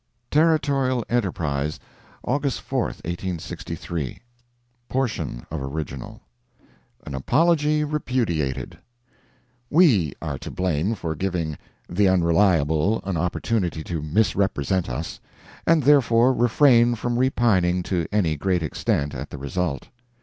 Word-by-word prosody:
Territorial 140 -6 +2
Enterprise, 80 - -1 0.4
August 140 0 -1
4, - - -1
1863 85 -4 -5 0.7
[portion 120 - -2
of 80 -3 -3
original] 70 -1 -6 0.8
AN - - -7
APOLOGY 150 - +2
REPUDIATED 120 - -2 0.9
We 125 - +4
are 75 -4 -4
to - - -7
blame 90 +3 -1
for 80 -5 -3
giving 85 -2 -2 0.3
"the 95 +3 +2
Unreliable" 85 0 +2
an 95 -2 -2
opportunity 90 0 -1
to 80 -2 -4
misrepresent 95 0 0
us, - - -5 0.5
and 165 -3 +4
therefore 125 -3 +5
refrain 120 0 +4
from 120 +2 -2
repining 95 -9 +2
to 85 -2 -1
any 90 -7 +1
great 90 +2 0
extent 75 -1 -1
at - - -6
the - - -7
result. 70 0 -3
95 Hz, 105 wpm, -23 LUFS, 80-120 Hz, 0.9 s, therefore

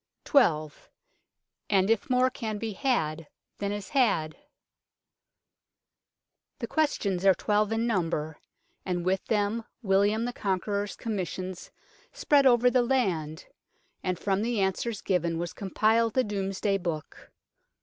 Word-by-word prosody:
12. 155 - +2 0.8
And 195 0 +3
if 225 - 0
more 255 0 +3
can 220 -5 -4
be 225 +1 -4
had 165 - -1 0.3
than 200 0 -2
is 205 -2 -5
had? 195 - +1 2.2
THE - - -4
questions 205 - 0
are 195 -1 +6
twelve 210 +2 +1
in 225 +1 0
number, 165 -8 -1 0.4
and 175 -2 -2
with 190 +1 +1
them 215 +1 0 0.2
William 205 +3 +2
the 245 - -3
Conqueror's 200 0 -2
Commissioners 185 -4 -4 0.4
spread 280 -2 +3
over 245 0 +5
the 255 - +4
land, 185 - -1 0.6
and 185 -1 -2
from 195 +2 0
the 230 0 -1
answers 195 +3 -1
given 170 -3 0
was 170 0 -4
compiled 220 +3 +1
the 255 - +4
Domesday 195 -1 -1
Book. 165 -4 -6
200 Hz, 125 wpm, -28 LUFS, 180-230 Hz, 2.2 s, are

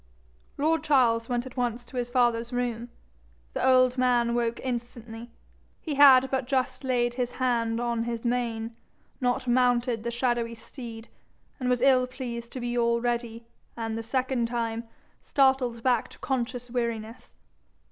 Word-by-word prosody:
Lord 315 +3 +1
Charles 235 -5 +3
went 245 0 -1
at 260 - -10
once 240 -1 -1
to 240 +2 -14
his 245 -1 -2
father's 240 -1 +1
room. 245 -1 -2 0.6
The - - -2
old 255 -1 +4
man 240 -2 +2
woke 235 -1 0
instantly. 235 -2 -5 0.5
He 310 - -4
had 265 -2 +7
but 265 -2 -1
just 260 0 -1
laid 245 -2 +1
his 245 -1 -2
hand 235 -3 0
on 235 -1 -1
his 235 0 -4
mane, 230 -2 -1 0.5
not 245 0 0
mounted 245 -1 +2
the 235 - -3
shadowy 235 -1 -1
steed, 230 0 -10 0.5
and 250 -1 -1
was 250 0 +1
ill 255 -2 +5
pleased 240 -2 -6
to 260 - -5
be 240 0 -3
already, 235 0 0 0.3
and 225 -1 -3
the 225 - -3
second 255 0 -1
time, 230 -1 -2 0.4
startled 265 -4 +2
back 245 -3 +2
to - - -15
conscious 250 -2 -3
weariness. 230 -2 -4
240 Hz, 150 wpm, -27 LUFS, 235-255 Hz, 0.6 s, had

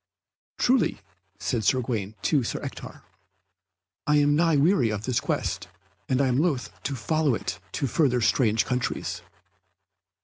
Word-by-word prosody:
"Truly," 250 -2 +2 0.4
said 115 - -1
Sir 130 +6 +3
Gawaine 110 -4 -3
to 145 -4 +3
Sir 115 - -3
Ector, - - -8 1.0
"I 150 - +4
am 145 0 +4
nigh 165 0 +3
weary 145 - +3
of 105 -1 -3
this 125 -2 +1
quest, - - -2 0.4
and 130 - +2 0.2
loth 150 -8 0
to 140 - -3
follow 140 +3 +1
it 90 -3 -4
to - - -1
further 130 -1 +2
strange 110 0 +2
countries." 125 -2 -2
130 Hz, 135 wpm, -26 LUFS, 115-150 Hz, 1.0 s, I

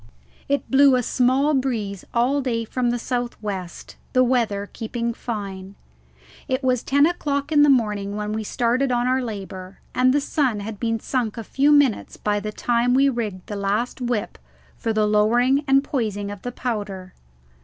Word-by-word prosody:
It 280 -2 -1
blew 270 0 +6
a 250 - +1
small 260 +5 +2
breeze 225 -8 -1
all 255 +4 +2
day 230 -3 -1
from 245 +2 -1
the 240 - 0
south 245 0 -3
west, 190 -5 -6 0.2
the 255 -1 +5
weather 230 -5 0
keeping 235 +1 -3
fine. 200 -5 -6 0.7
It 260 +1 -1
was 250 -2 +2
ten 285 +1 +3
o'clock 290 -3 -1
in 295 -1 +5
the 295 - +6
morning 210 -6 +1
when 210 0 -3
we 220 0 -2
started 250 +4 0
on 245 0 +1
our 260 +1 +2
labour, 195 -4 -7
and 255 0 +4
the 290 - +3
sun 270 -6 0
had 210 0 -6
been 225 -1 -1
sunk 235 -2 -2
a 230 - -4
few 280 +6 +2
minutes 285 -7 +2
by 205 0 0
the 210 +1 -5
time 240 +3 +1
we 270 +1 +5
had 275 -3 +1
rigged 205 -6 -4
the 205 - -6
last 205 +6 -1
whip 240 - -2 0.4
for 225 - -2
the 215 -1 +2
lowering 240 +7 +3
and 270 0 +4
poising 210 -8 -2
of 205 -2 -8
the 245 - -5
powder. 205 -7 -4
235 Hz, 185 wpm, -23 LUFS, 210-260 Hz, 0.7 s, blew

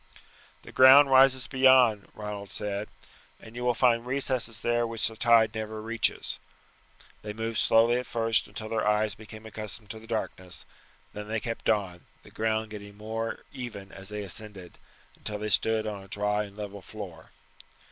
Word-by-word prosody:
"The - - -11
ground 135 +2 +8
rises 130 -1 +6
beyond," 130 -5 +4
Ronald 105 -2 -6
said, 105 0 -3 0.5
"and 115 +1 -14
you 125 - -5
will 125 -1 +2
find 120 -1 +3
recesses 125 -3 -1
there 120 0 +1
which 115 -1 0
the 110 - -6
tide 115 -2 +4
never 110 -1 -5
reaches." 115 +1 -1 0.8
They 105 -1 -6
moved 115 +1 -2
slowly 115 +2 +4
at 125 - -6
first 115 -1 +1
until 110 +1 -7
their 110 -2 -1
eyes 105 0 +2
became 110 0 -12
accustomed 110 0 -2
to 110 - -8
the 115 - -15
darkness; 95 -6 -4 0.5
then 105 0 -7
they 110 +1 -1
kept 115 +1 -3
on, 95 -5 -1 0.2
the - - -16
ground 110 0 -1
getting 100 -1 -9
more 110 +2 -4
even 110 -6 -7
as 95 +1 -9
they 105 0 -5
ascended, 100 -2 -7 0.4
until 105 - -5
they 105 +1 -4
stood 110 +2 +2
on 105 -2 -4
a 95 - -14
dry 105 +2 -1
and 100 0 -14
level 100 -1 -7
floor. 95 -5 -10
110 Hz, 170 wpm, -28 LUFS, 105-115 Hz, 0.8 s, ground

